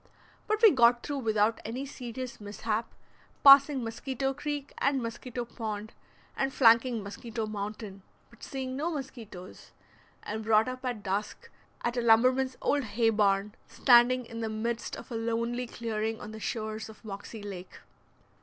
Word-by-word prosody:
But 430 +1 0
we 440 - +10
got 240 -3 +4
through 285 -1 -3
without 220 -2 +1
any 245 +5 -4
serious 250 -3 -7
mishap, 210 +2 -3 0.5
passing 275 -1 +8
Mosquito 265 +4 -3
Creek 290 0 -5
and 275 -1 +2
Mosquito 240 +1 -5
Pond, 220 -2 -6 0.4
and 270 0 0
flanking 230 -2 +4
Mosquito 220 +2 -5
Mountain, 210 -1 -6 0.3
but 235 - -20
seeing 260 -1 -5
no 305 +5 -1
mosquitoes, 235 - -8 0.5
and 220 +1 -4
brought 220 +1 +4
up 255 +1 -5
at 240 -5 -3
dusk 200 +2 -3 0.3
at 240 +1 -1
a - - +2
lumberman's 255 +3 +4
old 290 -1 +2
hay 225 +1 +1
barn, 205 -1 +2
standing 250 0 +5
in 230 0 -8
the 225 -1 -2
midst 225 +2 -3
of - - -11
a - - -3
lonely 230 +2 -1
clearing 225 -1 -3
on 215 - -8
the 220 - -8
shores 220 0 -4
of 220 +1 -15
Moxie 205 +1 -8
Lake. 190 -3 -8
230 Hz, 155 wpm, -29 LUFS, 215-255 Hz, 0.5 s, we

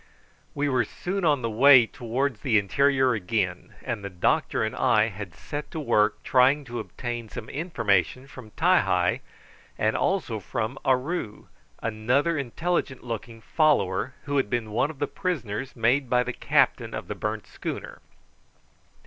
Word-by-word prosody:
We 145 0 0
were 130 -3 +2
soon 185 - -4
on 145 -6 +2
the 115 - 0
way 130 +2 +7
towards 125 +1 -2
the 115 0 +2
interior 130 +5 +3
again, 95 -3 -2
and 100 - -4
the 100 - -4
doctor 90 +3 +1
and 110 - -2
I 115 -4 +3
had 95 -4 -8
set 145 - -6
to 160 - -5
work 105 -7 +1
trying 135 +3 +3
to 120 -1 -5
obtain 120 -2 -5
some 110 - -7
information 130 - 0
from 130 -5 -12
Ti - - +3
hi, - - +1 0.6
and 110 +1 +1
also 175 - 0
from 110 +5 -4
Aroo, 130 -2 -1 0.3
another 120 +9 +1
intelligent 145 +1 -2
looking 115 -1 -6
follower 130 - +1
who 145 -2 -1
had 130 -7 +1
been 115 -2 -2
one 120 +7 +1
of 160 - -9
the 145 - 0
prisoners 140 - -4
made 125 +3 +2
by 125 0 +3
the 125 - -4
captain - - +1
of - - -6
the - - -3
burnt 105 0 -4
schooner. - - -6
125 Hz, 155 wpm, -26 LUFS, 110-140 Hz, 0.6 s, way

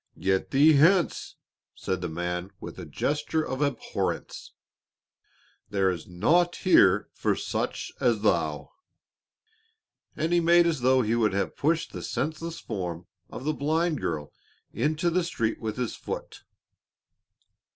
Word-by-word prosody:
"Get 95 0 0
thee 145 +3 +6
hence!" 170 +5 +3 0.4
said 95 -1 -3
the 90 - -3
man 90 +2 -3
with - - -9
a - - -7
gesture 150 +2 -1
of 130 +2 -4
abhorrence. 140 -5 -3 1.2
"There 95 -2 +2
is 85 -3 -6
naught 170 - +2
here 100 - +4
for - - 0
such - - -3
as 115 -4 +2
thou," 80 -7 0 1.4
and 160 +2 -1
he 175 - +5
made 170 +1 +5
as 160 -6 0
though 130 +1 +4
he 110 +1 0
would 110 -4 +2
have 100 - -1
pushed 160 +3 0
the - - -6
senseless 160 +2 -3
form 90 -5 -5 0.2
of 125 - -8
the 155 +2 0
blind 155 +1 0
girl 75 -3 -3 0.4
into 155 +3 0
the 180 +1 +1
street 115 -10 -2
with 110 -1 -4
his 125 -2 -2
foot. - - -7
130 Hz, 140 wpm, -27 LUFS, 95-160 Hz, 1.4 s, thee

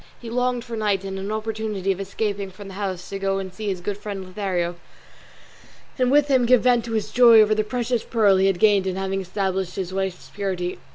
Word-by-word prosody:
He 230 -2 -8
longed 250 0 0
for 235 -1 -6
night 205 -3 0
and 195 0 -5
an 195 +2 -4
opportunity 215 -3 -2
of 190 - -3
escaping 200 0 -3
from 195 +1 -11
the - - -9
house 190 -2 -4
to 195 - -5
go 195 0 0
and 190 -1 -5
see 210 +3 -6
his 190 -3 -2
good 200 +2 -4
friend 200 -2 -6
Lothario, 185 -2 -2 1.2
and 250 -1 +3
with 290 +2 +5
him 260 -4 +3
give 250 -1 +5
vent 245 -2 +3
to 230 - -5
his 215 -2 -2
joy 235 -2 +7
over 215 0 +5
the 215 0 +1
precious 240 +1 -1
pearl 210 -5 +3
he 190 +1 +3
had 195 -2 +1
gained 200 -1 +4
in 185 - -1
having 195 0 -2
established 190 -1 -2
his 185 -1 -4
wife's 190 -2 -4
purity. 185 -3 -3
200 Hz, 225 wpm, -23 LUFS, 190-225 Hz, 1.2 s, joy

